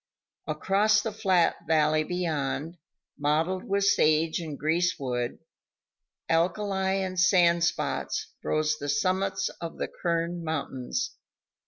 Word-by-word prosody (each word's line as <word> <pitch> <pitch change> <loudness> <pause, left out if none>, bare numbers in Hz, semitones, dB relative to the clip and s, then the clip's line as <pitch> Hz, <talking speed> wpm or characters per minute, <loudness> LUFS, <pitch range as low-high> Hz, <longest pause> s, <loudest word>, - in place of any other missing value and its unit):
Across 200 +7 +2
the 225 - -2
flat 190 -5 +2
valley 155 -1 +3
beyond, 160 -1 -2 0.4
mottled 160 +6 0
with 200 0 0
sage 160 -4 +3
and 155 -4 -6
greasewood, 145 -7 -1 0.9
alkali 190 +3 +1
and 185 -1 -3
sand 175 -2 +4
spots, 170 - -1
rose 155 0 0
the 145 - -4
summits 195 +1 0
of 165 -1 -6
the - - -2
Kern 170 0 -2
Mountains. 155 - -3
170 Hz, 110 wpm, -27 LUFS, 155-190 Hz, 0.9 s, sand